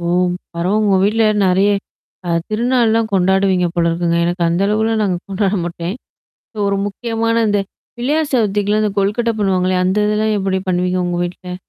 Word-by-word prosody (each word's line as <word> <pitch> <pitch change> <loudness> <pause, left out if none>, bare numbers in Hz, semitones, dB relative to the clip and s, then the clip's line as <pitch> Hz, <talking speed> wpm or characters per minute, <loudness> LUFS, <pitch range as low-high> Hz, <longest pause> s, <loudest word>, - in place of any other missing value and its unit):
ஓ! 170 - -6 0.5
பரவ 175 +4 -1
உங்க 200 -2 +3
வீட்ல 220 +2 +2 0.2
நெறைய. 190 +2 +3 0.6
அ - - -4 0.2
திருநாள்லாம் 230 0 +1
கொண்டாடுவீங்க 190 -1 +2
போல 170 -1 +1
இருக்குங்க. 170 0 0
எனக்கு 175 +1 -1
அந்த 170 +3 0
அளவுல 220 +2 +1
நாங்க 190 -4 0
கொண்டாட 195 +1 0
மாட்டேன். 170 +2 -4 0.7
ஒரு 200 0 +1
முக்கியமான 230 +2 -1
இந்த 205 -1 +2 0.4
பிள்ளையார்சதுத்திகலாம் 225 -7 0
இந்த 210 - +1
கொல்கட்ட 210 +4 +1
பண்ணுவாங்கல்லயா? 185 -2 +1
அந்த 190 +3 +1
இதெல்லாம் 215 +1 +1
எப்படி 190 -1 -1
பண்ணுவீங்க 180 0 0
உங்க 175 0 -2
வீட்ல? 180 +1 -7
195 Hz, 150 wpm, -17 LUFS, 180-220 Hz, 0.7 s, உங்க